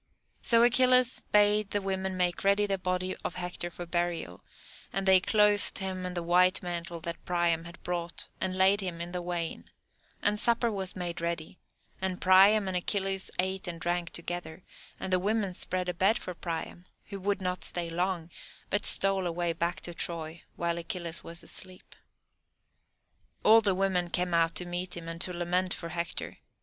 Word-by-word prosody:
So 230 0 +5
Achilles 255 +1 +4
bade 210 0 +4
the 205 - 0
women 190 -1 -2
make 175 -1 0
ready 200 +1 +4
the 195 -2 -1
body 185 0 -1
of - - -3
Hector 180 -1 -4
for 175 0 -8
burial, 175 - -2 0.5
and 195 0 -2
they 190 -1 +7
clothed 210 +1 +3
him 185 -1 -3
in 180 0 -5
a 175 - -2
white 180 +2 +3
mantle 170 -1 -4
that 170 +1 -6
Priam 170 -2 +1
had 170 +1 -11
brought, 175 -1 -3
and 185 0 -1
laid 195 +2 +5
him 180 -3 -4
in 170 +1 -5
the 180 0 -3
wain; 175 -2 -4 0.5
and 210 0 +4
supper 235 0 +2
was 190 -2 0
made 175 -2 -4
ready, 170 0 -3 0.4
and 190 -1 -2
Priam 195 +2 +6
and 190 - -2
Achilles 195 +1 -1
ate 190 +2 -1
and 170 -1 -5
drank 175 +1 -1
together, 170 0 -6 0.4
and 185 - -3
the 185 - +4
women 205 0 0
spread 180 0 -2
a 180 - -1
bed 195 +6 +3
for 180 - -6
Priam, 175 +1 -5 0.2
who 200 -1 -6
would 200 +1 0
not 180 -1 -3
stay 175 -1 -2
long, 175 0 -2 0.4
but 205 0 +2
stole 195 -2 +2
away 170 0 -1
back 170 +2 -2
to 175 - -4
Troy 165 -1 -4
while 170 0 -1
Achilles 170 -2 -4
was 170 +1 -7
asleep. 185 -1 -8 1.5
All 225 +1 +7
the 200 -3 +1
women 185 -2 +1
came 180 +1 -1
out 165 0 +3
to 180 - -1
meet 175 0 -4
him, 165 -1 -7
and 165 0 -6
to 185 - +3
lament 180 +1 0
for 170 - -6
Hector. 170 0 -4
180 Hz, 180 wpm, -29 LUFS, 170-195 Hz, 1.5 s, they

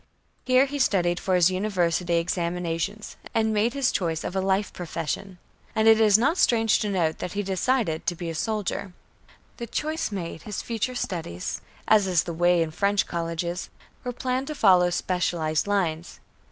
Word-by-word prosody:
Here 255 +1 +5
he 285 +1 -5
studied 175 -8 +2
for 185 - 0
his 180 0 +4
university 180 -3 0
examinations, 175 +3 -2 0.2
and 220 -1 +2
made 220 +5 +1
his 275 -2 +2
choice 165 -4 -1
of 180 - -4
a 190 - +1
life 195 +1 0
profession 175 +2 -4 0.4
and 220 0 +3
it 225 0 +7
is 210 -2 +6
not 280 +10 +1
strange 225 -2 +3
to 215 -3 -1
note 170 -5 0
that 180 - -5
he 205 0 -1
decided 190 -2 0
to 175 - +1
be 170 0 -6
a 165 - -3
soldier. 200 +1 -2 0.6
The 235 - -5
choice 310 +3 -2
made, 170 -5 -5
his 210 +3 -5
future 235 +2 -2
studies, 160 - -4 0.3
as 210 -3 +5
is 180 -4 +2
the 170 - -5
way 175 0 +3
in 160 - -5
French 200 +4 +1
colleges, 170 +1 -3 0.3
were 250 - -3
planned 255 +2 -2
to 305 - -4
follow 185 -7 +5
specialized 175 -2 -1
lines. 175 -5 -1
190 Hz, 175 wpm, -25 LUFS, 170-220 Hz, 0.6 s, it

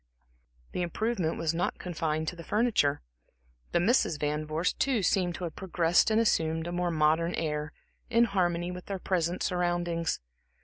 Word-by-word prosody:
The - - -2
improvement 180 -1 -1
was 165 -1 0
not 175 +2 -1
confined 160 -3 -2
to - - -9
the 170 - -9
furniture. 210 - +1 0.7
The - - +3
Misses 185 - +2
Van 150 +1 -2
Vorst, 160 +3 -1
too, 255 -7 +2
seemed 180 -1 +1
to - - -7
have 165 -3 -4
progressed 175 0 +2
and 220 0 +3
assumed 160 -7 +1
a 175 - -4
more 175 0 0
modern 160 +2 +2
air, 150 -1 -2 0.4
in 235 0 +4
harmony 175 -5 0
with 180 0 -8
their 195 - -3
present 175 -1 -1
surroundings. 175 -2 0
175 Hz, 165 wpm, -29 LUFS, 160-185 Hz, 0.7 s, in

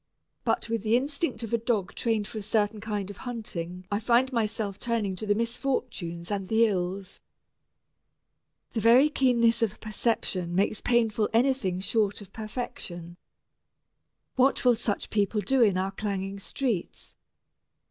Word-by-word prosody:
But - - 0
with 230 -2 -1
the 220 +2 +3
instinct 280 -2 -2
of 230 - -5
a 235 - +3
dog 220 -5 -1
trained 220 -3 0
for 220 - -6
a - - -5
certain 210 0 0
kind 205 -2 -3
of 200 - -12
hunting 185 -7 -5
I 205 - +1
find 245 +4 +2
myself 215 -3 -1
turning 225 -5 -1
to 215 - -5
the 205 - +3
misfortunes 230 -7 -2
and 195 -2 -2
the 225 +2 +4
ills. 190 -2 -3 1.5
The 225 - -2
very 245 +7 +6
keenness 235 -5 +3
of 215 -2 0
perception 200 -5 -1
makes 200 +2 +1
painful 225 -3 +2
anything 230 -7 +2
short 205 0 +1
of 200 -3 -13
perfection. 185 -7 -6 1.2
What 265 +1 +3
will 245 - +7
such 220 -2 -3
people 210 0 +1
do 265 +4 +2
in 205 -5 +4
our 190 +1 -1
clanging 195 -1 -3
streets? 225 -2 -3
215 Hz, 145 wpm, -27 LUFS, 195-235 Hz, 1.5 s, will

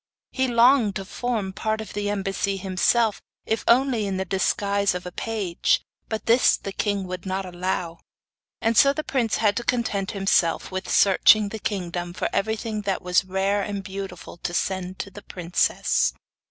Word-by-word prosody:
He 260 -1 0
longed 235 -3 +4
to 195 - -4
form 215 -3 -3
part 215 +2 -2
of 220 - -7
the 205 0 -2
embassy 195 0 -1
himself, 200 +4 +1 0.2
if 220 -1 -1
only 240 -3 +3
in 195 -1 -2
the 190 - -2
disguise 200 +1 +1
of 180 - -5
a 180 - -6
page; 200 -4 0 0.3
but 220 -1 -4
this 235 +2 +4
the 195 - -6
king 200 -1 -1
would 180 -1 -6
not 190 +1 -2
allow, 175 -2 -3 0.6
and 225 +1 +1
so 275 +5 +6
the 310 - -3
prince 245 -7 0
had 210 -2 +2
to 240 - -2
content 225 -6 -1
himself 195 -5 +1
with 190 +1 -4
searching 205 +1 +5
the 220 - -6
kingdom 175 -4 -3
for - - -2
everything 220 +1 -1
that 200 -2 -2
was 180 +1 +2
rare 195 +2 0
and 200 -1 -4
beautiful 190 -3 -7
to 175 +1 -4
send 185 0 -2
to 200 - -6
the 205 - -10
princess. 180 -2 0
200 Hz, 175 wpm, -24 LUFS, 185-220 Hz, 0.6 s, so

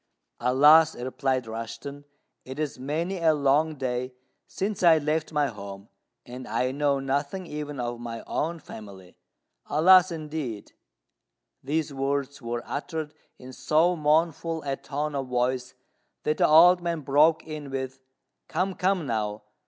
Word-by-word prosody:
"Alas!" 150 +6 +6
replied 130 0 -2
Rushten, 115 +6 -7 0.4
"it 130 +1 -8
is 150 -4 -3
many 165 +8 -2
a 160 -2 +3
long 150 +2 +2
day 125 -1 -3 0.3
since 200 +1 -3
I 170 -3 +7
left 155 +1 -1
my 150 -2 +2
home, 100 -4 -8 0.4
and 125 +1 -9
I 125 0 0
know 140 0 +1
nothing 140 +7 -2
even 150 -3 -6
of 120 -1 -3
my 115 -1 -6
own 170 +2 -2
family. 100 - -12 0.5
Alas, 180 +4 +6
indeed!" 150 -9 -5 0.9
These 150 +2 -1
words 140 +1 -2
were 120 0 -4
uttered 155 +1 -4 0.2
in 130 +1 -11
so 165 +7 +2
mournful 160 +1 +1
a 140 -1 -2
tone 145 +2 -4
of 135 -2 -3
voice 125 0 -1 0.5
that 155 - 0
the - - +4
old 175 +3 +7
man 170 -2 -2
broke 150 +4 +3
in 155 -2 -7
with, 130 -1 -4 0.5
"Come, 185 +4 -1
come, 185 -2 0
now! 105 -3 -2
145 Hz, 140 wpm, -26 LUFS, 125-160 Hz, 0.9 s, I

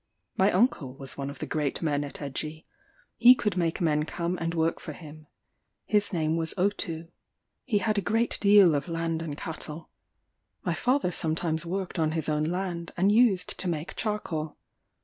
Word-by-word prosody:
My 195 +2 +4
uncle 180 - +1
was 135 -1 -6
one 140 0 -4
of 140 - -8
the - - -4
great 150 0 -2
men 145 -2 +1
at 145 - -8
Egie: 155 +3 -4 0.5
he 250 +1 +8
could 210 -6 -1
make 170 -2 0
men 155 -4 +2
come 170 +2 -2
and 165 0 -2
work 165 0 +1
for - - -7
him: 155 -1 -12 0.6
his 210 -1 +1
name 160 -3 0
was 165 -1 -1
Otou. 170 -4 -1 0.6
He 230 -6 +1
had 215 0 +1
a - - -2
great 225 +5 +1
deal 200 -4 +6
of 145 +1 -1
land 165 -1 -2
and 150 -3 -5
cattle. 160 0 -5 0.7
My - - 0
father 255 -7 +1
sometimes 160 0 -1
worked 185 0 -3
on 155 -1 +1
his 160 -2 -2
own 150 0 +1
land, 175 0 -3
and 190 +3 +4
used 215 -5 +3
to 185 - -1
make 160 0 -4
charcoal. 170 -8 -3
165 Hz, 180 wpm, -28 LUFS, 155-195 Hz, 0.7 s, he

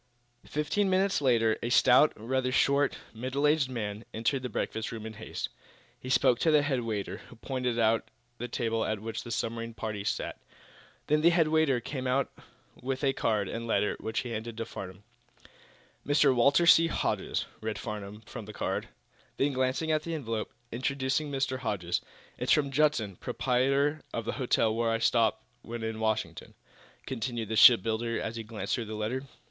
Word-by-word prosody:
Fifteen 170 +7 0
minutes 190 -3 +2
later 115 -5 +3
a 120 - -2
stout, 125 +4 +6
rather 125 +3 -1
short, 140 +2 +2 0.2
middle 130 +5 -2
aged 150 -3 +3
man 105 -3 -4
entered 115 +5 0
the 125 - -4
breakfast 110 0 -3
room 110 -1 -6
in 110 - -6
haste. 110 +1 -5 0.5
He 130 - -8
spoke 130 -1 +4
to 165 - +2
the 150 -2 +5
head 135 -4 0
waiter, 110 -4 -3
who - - -13
pointed 125 0 -2
out 115 -1 +2 0.3
the 120 - -3
table 115 -1 -1
at 110 -1 -1
which 110 +2 -5
the 120 - -9
submarine 115 0 -3
party 110 -3 -4
sat. - - -3 0.6
Then 150 +1 +2
the 170 - +6
head 170 -3 +3
waiter 155 -5 +3
came 130 +2 -4
over 130 +1 +2 0.5
with 130 +2 -3
a 135 -1 +3
card 105 -6 0
and 115 +3 -4
a - - -7
letter 105 -2 +1
which 110 0 -2
he 125 - -6
handed 115 0 -5
to 115 - -3
Farnum. 95 -2 -8 1.0
"'Mr. 145 -1 +4
Walter 140 +7 +4
C. 165 0 +7
Hodges,'" - - -1 0.2
read 110 -1 -3
Farnum, 105 -1 -6
from 110 0 -9
the 105 - -9
card. - - -2 0.5
Then, 140 +1 +1
glancing 130 +5 0
at 155 -1 +2
the 165 +1 -4
envelope 115 -7 -3 0.2
"'Introducing 135 +4 -1
Mr. 135 -2 -1
Hodges.' 90 -7 -1 0.4
It's - - 0
from 140 -2 +2
Judson, 130 - +1
proprietor 135 +4 +1
of 115 - -3
the - - -1
hotel 115 -3 +2
where 115 0 0
I 115 - +2
stop 115 -1 +2 0.2
when 115 -1 -6
in 110 0 -3
Washington," 110 -7 -2 0.5
continued 120 -3 -3
the 110 - -1
shipbuilder, 115 +1 +5
as 110 - -4
he 115 - -4
glanced 105 -3 -4
through 120 - -1
the 110 0 -6
letter. 115 +6 -2
120 Hz, 180 wpm, -29 LUFS, 110-135 Hz, 1.0 s, C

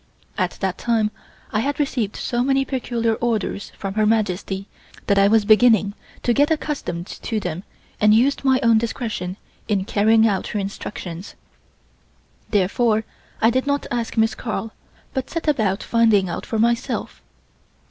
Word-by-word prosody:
At 185 -3 -1
that 190 -1 -1
time 225 -3 +1 0.4
I 215 - +2
had 280 +6 -1
received 245 -8 -1
so 240 0 -1
many 270 +1 +2
peculiar 235 -4 -1
orders 220 -3 -2
from 195 -1 -4
Her 215 0 +2
Majesty 195 -3 0 0.4
that 200 -1 +3
I 195 - +6
was 215 0 +4
beginning 215 -2 +5 0.3
to 240 - +2
get 290 +4 +3
accustomed 285 - -2
to 220 +2 -4
them 180 -2 -4 0.4
and 210 0 +5
used 250 +7 +3
my 265 -1 +4
own 230 -1 +5
discretion 220 -5 -3 0.3
in 200 -3 0
carrying 220 +2 +4
out 195 -3 -1
her 210 - -2
instructions. 195 -2 -6 1.1
Therefore 215 +2 +2 0.4
I 225 - +6
did 260 +3 0
not 285 0 0
ask 235 -1 -2
Miss 225 +1 +3
Carl, 225 -1 -4 0.4
but 265 -2 -3
set 330 -1 -4
about 220 -9 +1
finding 220 -5 +3
out 170 - -5
for 225 - -2
myself. 235 +3 0
220 Hz, 155 wpm, -22 LUFS, 200-240 Hz, 1.1 s, I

